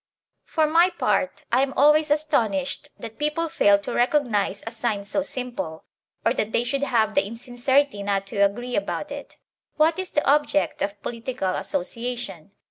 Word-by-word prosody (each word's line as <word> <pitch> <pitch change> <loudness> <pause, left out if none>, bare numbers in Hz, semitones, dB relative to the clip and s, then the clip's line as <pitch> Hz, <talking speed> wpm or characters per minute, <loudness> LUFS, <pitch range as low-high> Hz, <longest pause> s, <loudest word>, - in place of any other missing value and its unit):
For 315 -2 +1
my 335 +4 +4
part, 195 - -1
I 250 +2 +4
am 270 0 0
always 300 +2 +5
astonished 235 -11 0
that 225 -1 -9
people 300 +2 0
fail 205 -8 +4
to 200 - -6
recognize 240 -7 +1
a 225 - -4
sign 225 -3 -2
so 250 - -1
simple, 240 - -5 0.4
or 230 - +4
that 220 -4 -2
they 235 - +2
should 270 +3 -1
have 225 -6 +1
the - - +3
insincerity 245 +3 0
not 200 -1 -1
to - - -4
agree 240 +5 0
about 300 - -2
it. - - -8 0.4
What 320 +3 +3
is 375 -1 -3
the 295 - 0
object 295 +1 +2
of 200 0 -2
political 230 -5 -3
association 205 -3 -4
240 Hz, 165 wpm, -24 LUFS, 205-290 Hz, 0.4 s, always